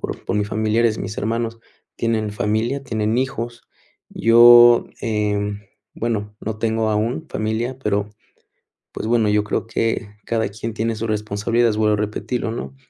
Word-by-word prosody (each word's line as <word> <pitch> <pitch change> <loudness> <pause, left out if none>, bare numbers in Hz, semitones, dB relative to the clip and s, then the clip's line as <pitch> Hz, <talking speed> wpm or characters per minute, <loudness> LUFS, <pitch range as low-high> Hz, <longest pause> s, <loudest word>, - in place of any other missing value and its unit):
por - - -6
por - - -2
mis 105 0 0
familiares, 110 +1 +1
mis 105 - -5
hermanos 115 +1 -2 0.3
tienen 110 -2 -1
familia, 110 +7 -1
tienen 110 -3 -1
hijos. 120 -3 -3 0.5
Yo, 120 +1 +7
eh, 105 -2 -1 0.4
bueno, 105 -3 -3
no 110 0 -5
tengo 110 -1 0
aún 115 +9 -1
familia, 115 +4 -2
pero, 105 -4 -1 0.8
pues, - - -5
bueno, 115 -2 +2
yo 105 0 +3
creo 105 - -2
que 115 -2 -2
cada 110 -3 0
quien 110 +2 -6
tiene 115 +1 -1
su 115 +1 -3
responsabilidad, 110 +2 0
vuelvo 105 0 +2
a - - +1
repetirlo, 110 +3 -3
¿no? 65 - -6
110 Hz, 150 wpm, -21 LUFS, 105-115 Hz, 0.8 s, Yo